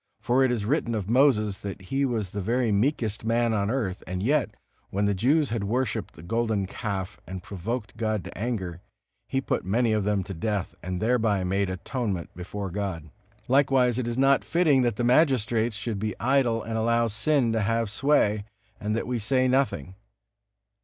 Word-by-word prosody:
For 125 Hz, +4 st, +2 dB
it 130 Hz, -, +3 dB
is 110 Hz, -4 st, -1 dB
written 120 Hz, -2 st, 0 dB
of 100 Hz, -4 st, -3 dB
Moses 110 Hz, -6 st, +3 dB
that 100 Hz, -2 st, -6 dB
he 135 Hz, +9 st, -1 dB
was 110 Hz, -7 st, -2 dB
the 100 Hz, -, -3 dB
very 115 Hz, +3 st, +1 dB
meekest 110 Hz, 0 st, 0 dB
man 115 Hz, 0 st, +1 dB
on 100 Hz, -1 st, 0 dB
earth, 110 Hz, -7 st, -2 dB
and 95 Hz, +1 st, -3 dB
yet, 140 Hz, +1 st, +2 dB, 0.4 s
when 100 Hz, +1 st, 0 dB
the 100 Hz, -, +2 dB
Jews 140 Hz, -, +2 dB
had 115 Hz, -3 st, -1 dB
worshiped 125 Hz, +5 st, -1 dB
the 75 Hz, -, -12 dB
golden 110 Hz, 0 st, 0 dB
calf 100 Hz, -1 st, -4 dB
and 90 Hz, +1 st, -6 dB
provoked 105 Hz, +5 st, -5 dB
God 110 Hz, -3 st, -1 dB
to -, -, -9 dB
anger, 95 Hz, -6 st, -3 dB, 0.5 s
he 135 Hz, -, 0 dB
put -, -, -1 dB
many 110 Hz, +5 st, +1 dB
of 105 Hz, -2 st, +1 dB
them 100 Hz, -1 st, +1 dB
to 95 Hz, -, -7 dB
death, 95 Hz, +1 st, -2 dB
and 90 Hz, 0 st, -4 dB
thereby 110 Hz, -3 st, +2 dB
made 95 Hz, +1 st, 0 dB
atonement 95 Hz, -1 st, -3 dB
before 95 Hz, +2 st, -5 dB
God. 90 Hz, -6 st, -4 dB, 0.4 s
Likewise 130 Hz, -2 st, +3 dB
it 120 Hz, -, -2 dB
is 120 Hz, 0 st, -2 dB
not 135 Hz, +1 st, +4 dB
fitting 160 Hz, -6 st, +3 dB
that 120 Hz, -4 st, +1 dB
the 120 Hz, -, -2 dB
magistrates 120 Hz, -4 st, +3 dB
should 110 Hz, -1 st, -3 dB
be 105 Hz, -1 st, -3 dB
idle 120 Hz, -3 st, +2 dB
and 110 Hz, 0 st, -2 dB
allow 115 Hz, +1 st, +2 dB
sin 115 Hz, +3 st, +1 dB
to 110 Hz, -1 st, +1 dB
have 115 Hz, 0 st, 0 dB
sway, 105 Hz, -5 st, +2 dB, 0.4 s
and 105 Hz, +1 st, -1 dB
that 115 Hz, -, -1 dB
we 125 Hz, -1 st, -2 dB
say 130 Hz, +4 st, +2 dB
nothing. 130 Hz, -, 0 dB
110 Hz, 185 wpm, -26 LUFS, 100-125 Hz, 0.5 s, not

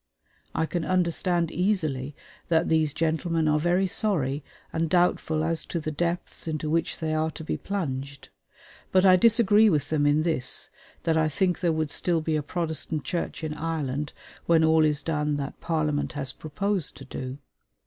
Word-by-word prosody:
I 160 Hz, -, +1 dB
can 170 Hz, +1 st, -2 dB
understand 175 Hz, -1 st, +1 dB
easily 155 Hz, -8 st, 0 dB, 0.3 s
that 165 Hz, 0 st, +2 dB
these 160 Hz, -2 st, +3 dB
gentlemen 165 Hz, +1 st, 0 dB
are 150 Hz, 0 st, +3 dB
very 175 Hz, +4 st, +2 dB
sorry 155 Hz, -8 st, +1 dB, 0.3 s
and 165 Hz, 0 st, 0 dB
doubtful 160 Hz, -3 st, +2 dB
as 165 Hz, 0 st, 0 dB
to 170 Hz, -, -3 dB
the 155 Hz, 0 st, -3 dB
depths 170 Hz, +2 st, -3 dB
into 155 Hz, -1 st, -2 dB
which 165 Hz, 0 st, 0 dB
they 155 Hz, -1 st, -2 dB
are 155 Hz, 0 st, +1 dB
to 160 Hz, -, -8 dB
be -, -, -2 dB
plunged; 140 Hz, -8 st, -4 dB, 0.6 s
but 185 Hz, 0 st, +4 dB
I 185 Hz, -1 st, +8 dB
disagree 215 Hz, +1 st, +5 dB
with 150 Hz, -5 st, 0 dB
them 145 Hz, -2 st, +2 dB
in 150 Hz, +2 st, +3 dB
this 160 Hz, -6 st, -1 dB, 0.3 s
that 165 Hz, -1 st, +2 dB
I 155 Hz, -1 st, +3 dB
think 180 Hz, +3 st, 0 dB
there 175 Hz, -2 st, +2 dB
would 155 Hz, -2 st, -1 dB
still 170 Hz, +1 st, +1 dB
be 155 Hz, 0 st, -1 dB
a 155 Hz, -, +1 dB
Protestant 160 Hz, -1 st, -3 dB
Church 170 Hz, -2 st, -3 dB
in 155 Hz, -1 st, -2 dB
Ireland 150 Hz, -3 st, -3 dB, 0.4 s
when 165 Hz, -1 st, +5 dB
all 160 Hz, 0 st, +5 dB
is 150 Hz, -1 st, +1 dB
done 150 Hz, -2 st, 0 dB
that 140 Hz, -1 st, -5 dB
Parliament 155 Hz, -3 st, -1 dB
has 135 Hz, -3 st, -3 dB
proposed 185 Hz, +2 st, -2 dB
to 135 Hz, -, -10 dB
do. 130 Hz, 0 st, -6 dB
160 Hz, 175 wpm, -26 LUFS, 150-175 Hz, 0.6 s, I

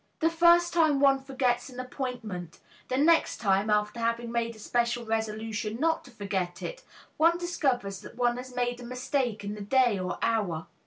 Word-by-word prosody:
The 325 Hz, 0 st, +2 dB
first 340 Hz, +1 st, +5 dB
time 315 Hz, -4 st, +3 dB
one 275 Hz, -1 st, +4 dB
forgets 260 Hz, -2 st, -1 dB
an 250 Hz, -1 st, -10 dB
appointment; 240 Hz, -, -5 dB, 0.3 s
the 255 Hz, -, -1 dB
next 325 Hz, +4 st, +4 dB
time, 200 Hz, -1 st, +1 dB
after 210 Hz, +2 st, +1 dB
having 230 Hz, 0 st, -1 dB
made 230 Hz, -1 st, -1 dB
a -, -, -14 dB
special 235 Hz, +2 st, -1 dB
resolution 220 Hz, 0 st, -2 dB
not 320 Hz, +2 st, +1 dB
to -, -, -13 dB
forget 195 Hz, -6 st, -3 dB
it, -, -, -5 dB, 0.4 s
one 335 Hz, +2 st, +4 dB
discovers 265 Hz, -, -1 dB
that -, -, -12 dB
one 240 Hz, 0 st, +1 dB
has 250 Hz, 0 st, -8 dB
made 245 Hz, 0 st, -1 dB
a -, -, -8 dB
mistake 250 Hz, -3 st, -2 dB
in 205 Hz, +1 st, -4 dB
the 210 Hz, -, -7 dB
day 240 Hz, -1 st, +3 dB
or 185 Hz, 0 st, -3 dB
hour. 195 Hz, -8 st, 0 dB
240 Hz, 180 wpm, -28 LUFS, 215-270 Hz, 0.4 s, first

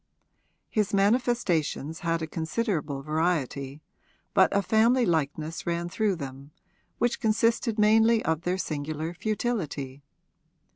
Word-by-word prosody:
His 210 Hz, -1 st, +1 dB
manifestations 195 Hz, -, +1 dB
had 165 Hz, -1 st, -1 dB
a -, -, 0 dB
considerable 160 Hz, -, -2 dB
variety, 150 Hz, -3 st, -1 dB, 0.5 s
but -, -, +5 dB
a 200 Hz, 0 st, +2 dB
family 230 Hz, +5 st, +3 dB
likeness 160 Hz, -1 st, -2 dB
ran 170 Hz, 0 st, -1 dB
through 205 Hz, +2 st, 0 dB
them, 140 Hz, -2 st, -8 dB, 0.5 s
which 240 Hz, +1 st, 0 dB
consisted 230 Hz, +1 st, +1 dB
mainly 220 Hz, +2 st, +4 dB
of 160 Hz, 0 st, 0 dB
their 180 Hz, +2 st, -1 dB
singular 155 Hz, 0 st, -3 dB
futility. 170 Hz, -, -3 dB
170 Hz, 110 wpm, -27 LUFS, 155-220 Hz, 0.5 s, but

